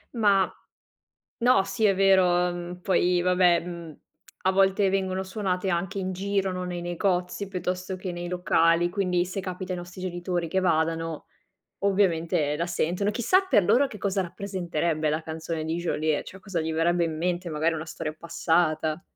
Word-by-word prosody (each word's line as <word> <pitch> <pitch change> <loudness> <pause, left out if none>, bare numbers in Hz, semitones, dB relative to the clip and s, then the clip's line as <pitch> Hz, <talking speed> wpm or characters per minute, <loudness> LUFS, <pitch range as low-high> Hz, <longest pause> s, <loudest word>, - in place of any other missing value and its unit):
Ma, 200 -4 +4 0.9
no, 240 -5 +4
sì 220 +2 0
è 195 - +4
vero, 190 -1 +5 0.2
mhmm, 175 +1 -7
poi 180 -1 +2
vabbè, 180 -1 +4
mhmm, 170 -3 -8 0.5
a 190 - +3
volte 195 +1 +3
vengono 190 -1 -1
suonate 190 -1 -2
anche 190 +3 -2
in 185 0 -2
giro, 195 0 -1
no, 185 0 -4
nei 175 -1 -4
negozi 180 +2 -1
piuttosto 180 0 -3
che 185 -1 -5
nei 175 0 -5
locali, 175 -1 +2
quindi 180 -2 +1
se 185 +2 -4
capita 185 0 -5
ai 180 - -3
nostri 175 +1 -9
genitori 175 -1 -2
che 190 +3 +1
vadano 165 -2 0 0.6
ovviamente 170 -6 +2
la 170 - -1
sentono. 175 +4 0
Chissà 245 - +3
per 210 -7 +4
loro 275 +10 +4
che 210 - -10
cosa 195 0 0
rappresenterebbe 170 -4 -2
la 155 +1 -1
canzone 160 0 -4
di 160 +2 -2
Geolier, 155 -3 0
cioè 190 - -11
cosa 190 -3 -3
gli 160 0 -2
verrebbe 170 +2 +2
in 160 -1 -3
mente, 175 +2 -1
magari 160 +2 +1
una 160 0 -5
storia 155 -1 -5
passata. 165 -1 0
180 Hz, 170 wpm, -26 LUFS, 170-190 Hz, 0.9 s, vero